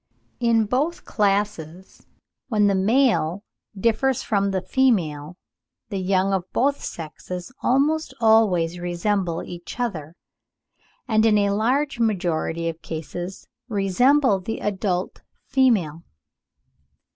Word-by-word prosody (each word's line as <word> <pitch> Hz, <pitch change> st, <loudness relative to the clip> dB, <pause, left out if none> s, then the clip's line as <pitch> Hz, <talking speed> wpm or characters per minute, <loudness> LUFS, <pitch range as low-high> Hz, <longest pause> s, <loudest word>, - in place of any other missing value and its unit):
In 230 Hz, -2 st, +3 dB
both 280 Hz, +10 st, -1 dB
classes, 195 Hz, -4 st, -2 dB, 0.4 s
when 210 Hz, -4 st, +2 dB
the 200 Hz, -, +3 dB
male 205 Hz, -, +2 dB, 0.4 s
differs 235 Hz, +4 st, +1 dB
from 200 Hz, -2 st, +1 dB
the 190 Hz, -1 st, 0 dB
female, 175 Hz, -, 0 dB, 0.5 s
the 195 Hz, -, -3 dB
young 190 Hz, +1 st, +1 dB
of 185 Hz, -1 st, -2 dB
both 280 Hz, +2 st, 0 dB
sexes 175 Hz, +5 st, -7 dB
almost 290 Hz, +3 st, +1 dB
always 190 Hz, -7 st, +3 dB
resemble 175 Hz, 0 st, -1 dB
each 175 Hz, +6 st, -9 dB
other, 170 Hz, -10 st, -3 dB, 0.9 s
and 220 Hz, -2 st, +3 dB
in 220 Hz, -2 st, +4 dB
a 200 Hz, -1 st, +2 dB
large 250 Hz, +6 st, 0 dB
majority 170 Hz, -6 st, 0 dB
of 165 Hz, 0 st, -5 dB
cases 175 Hz, +3 st, -6 dB, 0.2 s
resemble 225 Hz, +4 st, +3 dB
the 225 Hz, +5 st, -4 dB
adult 190 Hz, -3 st, -2 dB, 0.2 s
female. 210 Hz, -, +2 dB
200 Hz, 110 wpm, -23 LUFS, 175-235 Hz, 0.9 s, in